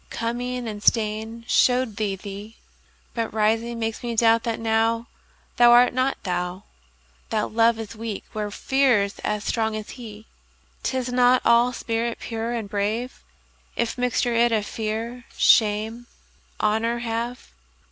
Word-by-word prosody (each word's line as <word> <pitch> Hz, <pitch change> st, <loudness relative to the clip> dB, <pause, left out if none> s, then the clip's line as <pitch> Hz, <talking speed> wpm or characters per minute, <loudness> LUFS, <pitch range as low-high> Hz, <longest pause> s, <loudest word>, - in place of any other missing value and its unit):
Coming 245 Hz, +1 st, -3 dB
and 210 Hz, -2 st, -6 dB
staying 220 Hz, +1 st, 0 dB
show'd 250 Hz, -5 st, +2 dB
thee 205 Hz, -3 st, -1 dB
thee; 200 Hz, +3 st, -9 dB, 0.6 s
But 230 Hz, -2 st, -2 dB
rising 225 Hz, +2 st, 0 dB
makes 225 Hz, -1 st, -3 dB
me 240 Hz, -2 st, -3 dB
doubt 225 Hz, 0 st, +4 dB
that 230 Hz, -1 st, -2 dB
nowThou 225 Hz, +1 st, +1 dB, 0.5 s
art 240 Hz, 0 st, +7 dB
not 255 Hz, +2 st, 0 dB
thou. 180 Hz, +1 st, -3 dB, 0.7 s
That 215 Hz, -1 st, -1 dB
Love 230 Hz, +1 st, +3 dB
is 225 Hz, 0 st, -7 dB
weak 220 Hz, -2 st, -5 dB
where 210 Hz, -1 st, -3 dB
Fear's 235 Hz, -3 st, +1 dB
as 210 Hz, 0 st, -2 dB
strong 220 Hz, -2 st, -1 dB
as 215 Hz, -1 st, -6 dB
he;'Tis 240 Hz, +2 st, -7 dB
not 250 Hz, 0 st, +4 dB
all 235 Hz, +1 st, +5 dB
spirit 230 Hz, -1 st, -2 dB
pure 225 Hz, 0 st, -4 dB
and 230 Hz, -3 st, -3 dB
brave, 210 Hz, +5 st, -2 dB, 0.5 s
If 235 Hz, -1 st, -1 dB
mixture 245 Hz, -1 st, 0 dB
it 235 Hz, +1 st, +3 dB
of 215 Hz, -2 st, +1 dB
Fear, 230 Hz, +3 st, -4 dB
Shame, 220 Hz, +2 st, +3 dB, 0.5 s
Honour 220 Hz, +2 st, +1 dB
have. 235 Hz, +1 st, -4 dB
230 Hz, 135 wpm, -24 LUFS, 215-240 Hz, 0.7 s, art